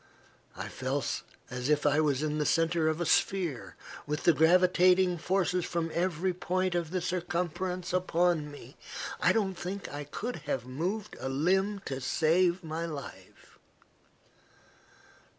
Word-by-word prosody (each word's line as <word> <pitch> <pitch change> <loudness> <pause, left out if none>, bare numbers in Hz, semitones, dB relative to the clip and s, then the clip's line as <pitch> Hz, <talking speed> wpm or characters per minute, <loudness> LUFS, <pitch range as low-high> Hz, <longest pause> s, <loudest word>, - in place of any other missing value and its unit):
I - - -4
felt - - -2 0.3
as 125 +2 -3
if 150 -1 +2
I 145 +1 +4
were 150 -2 +3
in 150 +3 -1
the 150 - +1
centre 165 +1 +2
of 155 +1 0
a 175 - 0
sphere, 170 -8 0 0.3
with 150 +1 -2
the 170 - +6
gravitating 180 +2 +4
forces 180 0 +1
from 165 -1 -2
every 180 +1 0
point 185 +1 -1
of 170 -2 -1
the 180 +1 -2
circumference 180 0 -2
upon 175 -3 +1
me. 145 - -12 0.4
I - - +4
don't 200 -4 +1
think 185 +1 -6
I 145 0 -5
could 235 +11 -4
have 140 -5 -3
moved 180 +11 -3
a 130 - -3
limb 190 +8 +1
to 135 -1 -4
save 170 +7 +2
my 165 +1 -3
life. 145 -4 -10
170 Hz, 145 wpm, -30 LUFS, 150-185 Hz, 0.4 s, the